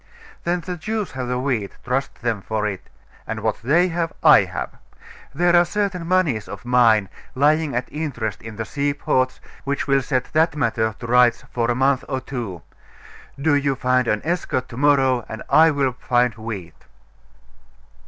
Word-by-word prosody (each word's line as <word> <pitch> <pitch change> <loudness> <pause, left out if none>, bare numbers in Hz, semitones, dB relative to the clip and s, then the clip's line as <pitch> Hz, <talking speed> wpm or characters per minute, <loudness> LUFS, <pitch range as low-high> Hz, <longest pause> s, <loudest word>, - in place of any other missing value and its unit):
'Then 175 +1 0
the 180 +1 -5
Jews 215 +4 -3
have 130 -2 -4
the 125 0 -1
wheat, 125 -6 -2
trust 130 +1 -3
them 115 -4 -1
for 110 +1 -2
it; 100 -3 -5 0.4
and - - -4
what - - -1
they 165 +9 +3
have 165 -1 -2
I - - +7
have. - - -5 0.6
There 175 0 +2
are 175 - +7
certain 180 -2 -2
moneys 165 - +1
of - - -9
mine 115 -5 +4 0.3
lying 150 +1 +2
at 120 - -1
interest 130 -9 -4
in 110 -1 -9
the 115 - -4
seaports, 140 -2 -1 0.2
which 140 0 -2
will 135 -1 +2
set 130 -1 -2
that 160 0 +3
matter 110 -7 0
to 120 - -8
rights 120 0 +4
for 115 -1 -1
a 120 - +1
month 135 +1 +2
or 130 -2 -1
two. 120 -10 -6 0.8
Do 150 +2 +2
you 140 -1 +1
find 125 -1 +1
an 105 -1 +1
escort 160 -6 -2
to 115 - -9
morrow, 135 -3 +3
and 110 - -6
I 160 +1 +7
will 140 -3 +1
find 125 -1 +1
wheat. 105 -8 -8
130 Hz, 175 wpm, -22 LUFS, 120-155 Hz, 0.8 s, I